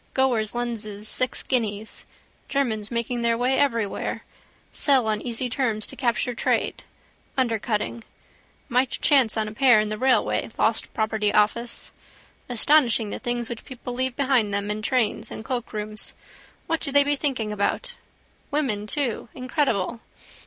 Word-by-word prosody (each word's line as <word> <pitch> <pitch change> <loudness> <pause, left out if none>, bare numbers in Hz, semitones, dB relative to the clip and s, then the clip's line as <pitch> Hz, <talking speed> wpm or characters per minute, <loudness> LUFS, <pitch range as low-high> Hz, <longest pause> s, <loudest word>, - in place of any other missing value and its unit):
Goerz 240 -5 +2
lenses 215 -3 -3
six 255 +3 0
guineas. 220 -4 -2 0.4
Germans 220 -7 0
making 235 +1 -2
their 230 0 +2
way 255 +2 +2
everywhere. 230 -7 0 0.5
Sell 265 -6 +3
on 215 -1 0
easy 245 +1 -2
terms 230 -4 0
to - - -9
capture 245 -1 0
trade. - - 0 0.5
Undercutting. 230 -2 -1 0.6
Might 250 0 +2
chance 265 -8 +3
on 215 -1 0
a - - -5
pair 245 0 +5
in 210 0 0
the 215 0 -4
railway 260 0 +2
lost - - +1
property 215 -1 +1
office. 235 +3 +1 0.6
Astonishing 240 -3 +3
the - - -4
things 240 -1 -1 0.2
people 250 -1 -7
leave 255 0 0
behind 260 -7 +2
them 200 +1 -1
in 210 +1 -3
trains 220 -2 0
and 220 - -8
cloakrooms. 215 -4 -4 0.5
What 330 - 0
do 280 - -3
they 285 +1 +6
be 290 +1 +2
thinking 260 -7 -1
about? 210 - -1 0.6
Women 245 -9 -1
too. 250 -4 -1
Incredible. 255 - 0
235 Hz, 140 wpm, -24 LUFS, 215-260 Hz, 0.6 s, they